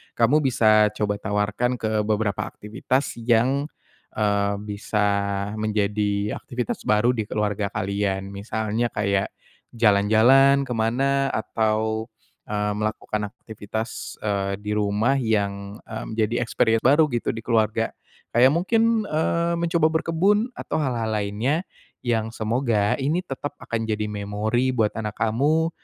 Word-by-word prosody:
kamu 120 +6 +4
bisa 110 -6 +4
coba 105 -1 -1
tawarkan 105 +4 0
ke 110 -2 -1
beberapa 105 -2 0
aktivitas 120 +4 -3
yang, 125 +5 +2 0.5
eee, 100 -1 +1
bisa 105 0 -1 0.5
menjadi 105 -1 0
aktivitas 120 -2 -4
baru 105 +4 +4
di 110 -4 -3
keluarga 105 -1 -1
kalian. 100 -1 -2
Misalnya 110 +3 -2
kayak 100 -1 0 0.5
jalan-jalan 115 +6 +5
ke 125 - -2
mana 135 +5 +1
atau, 110 0 -1 0.4
eee, 105 0 -1
melakukan 105 -1 -3
aktivitas, 110 -1 -6
eee, 100 -2 -1
di 105 0 -5
rumah 105 +5 +1
yang, 100 -4 -1
eee, 110 -1 -6
menjadi 110 +1 0
experience 115 -1 +1
baru 150 +4 +5
gitu 120 - -1
di 115 - -6
keluarga. 115 -1 +1 0.5
Kayak 130 +3 +6
mungkin, 225 +5 +2
eee, 170 +2 0
mencoba 170 -2 +2
berkebun 205 +8 +1
atau - - -4
hal-hal 120 -6 -1
lainnya 110 - -1 0.4
yang 115 -1 0
semoga 110 -2 0
ini 150 +6 0
tetap 145 -3 -6
akan 115 -1 -3
jadi 105 -1 -1
memori 105 +5 -1
buat 110 -4 +2
anak 105 -2 -3
kamu 145 +9 +2
110 Hz, 125 wpm, -24 LUFS, 105-130 Hz, 0.5 s, Kayak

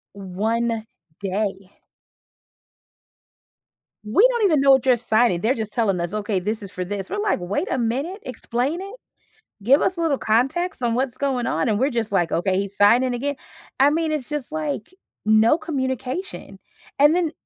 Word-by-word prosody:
One 220 +4 -2 0.3
day. 195 -1 -3 2.3
We 395 - +5
don't 475 -3 0
even 315 -8 +4
know 275 0 +5
what 265 -1 +4
you're 250 -2 +4
signing. 220 -5 +2
They're 235 +4 +2
just 220 -3 -5
telling 200 -6 +1
us, 175 +3 -4
okay, 210 -2 -1
this 215 +4 -3
is 195 - -9
for 180 - -4
this. 195 0 -5
We're, - - -3
like, 205 - -1
a - - 0
minute, 270 - -2
explain 255 +7 -3
it. 395 +4 -8 0.7
Give 270 +6 +5
us 370 - 0
a - - -2
little 300 -5 +1
context 260 +8 0
on 235 -1 +1
what's 255 -1 -1
going 265 -3 -1
on. 165 +6 0
And 210 0 +1
we're 270 +3 +2
just, 230 -4 -2
like, 175 -4 +1
"Okay, 185 +2 +1
he's 200 0 -5
signing 245 +5 +4
again." 285 +3 -2 0.4
I 280 +2 +6
mean, 320 +1 0
it's 300 -4 -3
just, 295 -2 -4
like, 305 - -4 0.3
no 220 +7 +5
communication. 270 - -4 0.4
And 295 +4 +6
then 340 -3 +1
245 Hz, 170 wpm, -22 LUFS, 210-290 Hz, 2.3 s, I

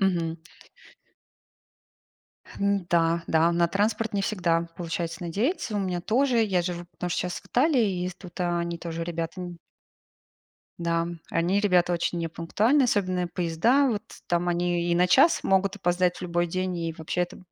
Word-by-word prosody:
Мгм. 170 -4 +1 2.2
Н-да, 170 -4 +1
да, 165 +1 +3
на 170 0 +2
транспорт 210 +4 0
не 200 - +1
всегда 170 -5 0
получается 170 0 -4
надеяться. 215 - -1
У 205 - +1
меня 180 -2 -2
тоже, 240 +5 +2
я 190 -5 +2
живу 175 0 -4
потому 180 - -5
что - - -1
щас 180 -1 -4
в - - -26
Италии, 260 -1 +3
и 185 -4 -1
ест 180 0 -5
тут 180 -2 -12
они 170 -1 -1
тоже 165 0 -5
ребята 165 +1 -4
н 175 -1 -7 1.2
Да, 170 0 0 0.2
они 175 +4 +1
ребята 180 -3 +3
очень 175 0 -1
непунктуальные, 205 - +1
особенно 185 -5 0
поезда. 185 - +2
Вот 220 -2 -2 0.2
там 175 0 0
они 175 0 0
и - - +3
на 180 +1 +4
час 275 - +5
могут 195 +1 +2
опоздать 180 -2 +1
в - - -11
любой 175 -1 0
день, 185 +1 -2
и 165 -1 -3
вообще 160 +2 -2
это 175 - -4
175 Hz, 160 wpm, -26 LUFS, 170-200 Hz, 2.2 s, час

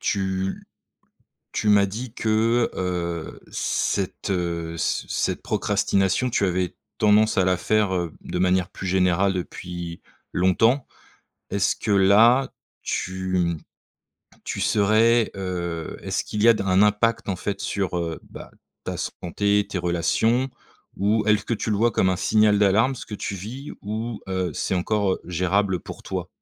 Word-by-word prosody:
Tu 95 -1 -1 0.9
tu 105 - -1
m'as 100 -1 +5
dit 110 +4 -6
que, 115 +2 +2
heu, 85 -3 -3
cette, 100 0 -1
heu, 85 -2 -2
ce - - -1
cette - - -1
procrastination, 100 +3 +1
tu 100 - +1
avais 90 -1 -1 0.2
tendance 105 +1 +4
à 95 - +4
la 90 0 +2
faire, 105 0 +1
heu, 85 -3 -2
de - - -4
manière 90 -1 +2
plus 95 - -7
générale 95 +1 +2
depuis 85 -1 -6 0.3
longtemps. 115 +9 +3 0.7
Est-ce 100 -1 +1
que 105 - -2
là, 110 +7 +5 0.3
tu 95 0 -2
mmh, 85 -2 +1 0.9
tu - - -4
serais, 110 +3 +3
heu, 85 -4 -4
est-ce - - -1
qu'il 105 0 -3
y 115 - +6
a - - +9
d 105 - -2
un 95 +1 +4
impact 105 +2 +2
en 95 - -2
fait 100 +2 -4
sur, 95 -3 -2
heu, 85 -2 -3
bah - - -10 0.3
ta - - -3
santé, 100 +3 0
tes 95 - -3
relations? 100 +9 +1 0.5
Ou 105 +2 +2
est-ce 105 -1 +3
que 115 - 0
tu 110 - -3
le 105 - +1
vois 115 +3 +3
comme 95 - +2
un 90 - 0
signal 105 +2 +3
d'alarme 105 +6 +3
ce - - -8
que 105 - -6
tu 100 - -4
vis? 120 +10 -7
Ou 110 +2 -4
heu, 95 -3 -1
c'est - - -1
encore, 100 +1 +1
heu, - - -9
gérable 90 +2 0
pour - - -10
toi? - - -4
100 Hz, 160 wpm, -24 LUFS, 90-110 Hz, 0.9 s, a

